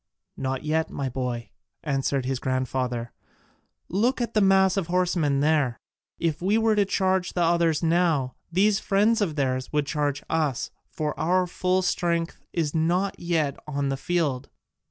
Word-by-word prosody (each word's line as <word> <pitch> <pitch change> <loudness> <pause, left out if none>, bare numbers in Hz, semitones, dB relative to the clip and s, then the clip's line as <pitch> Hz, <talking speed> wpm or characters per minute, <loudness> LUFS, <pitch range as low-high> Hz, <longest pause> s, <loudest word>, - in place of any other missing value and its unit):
"Not 135 +1 -3
yet, 160 +1 0
my 135 -2 -3
boy," 125 -2 -4 0.3
answered 135 -2 0
his 130 -1 -1
grandfather, 130 -2 -2 0.8
"look 230 +9 +1
at 235 -1 -2
the 215 - +3
mass 190 -1 +4
of 195 -5 -1
horsemen 175 -6 +1
there. 145 -5 +2 0.4
If 165 -2 -1
we 200 +4 +2
were 225 -1 +3
to 205 -1 +3
charge 190 -1 0
the 175 - +1
others 170 -1 +2
now, 165 -6 +2 0.2
these 200 +3 +3
friends 210 +3 +2
of 170 -7 0
theirs 130 -3 -1
would 150 -1 +1
charge 145 -1 -1
us, 155 -6 -1 0.2
for 150 -1 -2
our 180 +3 +2
full 185 +1 0
strength 170 -2 -1
is 160 -4 -1
not 175 +5 0
yet 160 -5 0
on 140 -2 -1
the 135 - 0
field." 145 -4 -1
160 Hz, 155 wpm, -25 LUFS, 140-185 Hz, 0.8 s, mass